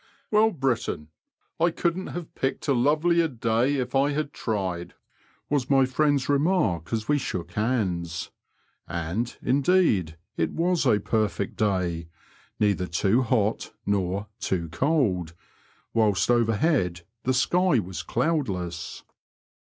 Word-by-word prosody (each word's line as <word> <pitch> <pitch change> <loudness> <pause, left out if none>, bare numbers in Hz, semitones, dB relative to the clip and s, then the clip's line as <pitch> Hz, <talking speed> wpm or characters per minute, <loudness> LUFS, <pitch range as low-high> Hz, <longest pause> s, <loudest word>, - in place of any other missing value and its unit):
'< - - -40
Well, 215 +1 +5
Brittain, 130 - -2 0.5
I 170 +1 +4
couldn't 170 +2 -1
have 175 -2 -7
picked 135 +3 -2
a 140 - +4
lovelier 155 +6 +3
day 125 0 +1
if 130 -3 -2
I 140 +2 +3
had 145 -1 -2
tried," 90 -5 -3 0.5
was 140 -3 0
my 135 -1 +5
friend's 140 0 +1
remark 140 - +1
as 110 -2 -2
we 150 0 +3
shook 90 -9 -4
hands; 90 -7 -1 0.6
and, 90 +8 -3
indeed, 130 - +2 0.2
it 80 -2 0
was 170 -3 +1
a 105 -4 +4
perfect 105 -1 -1
day 90 -5 0 0.3
— - - -32
^neither 95 -4 +1
too 100 +8 +2
hot 110 -3 0
nor 100 0 0
too 85 -3 -2
cold, 90 - 0 0.6
whilst 110 -1 +2
overhead 115 - +2 0.2
the 130 - 0
sky 180 +4 +3
was 90 -6 -3
cloudless. 95 - -2
115 Hz, 130 wpm, -26 LUFS, 90-145 Hz, 0.6 s, Well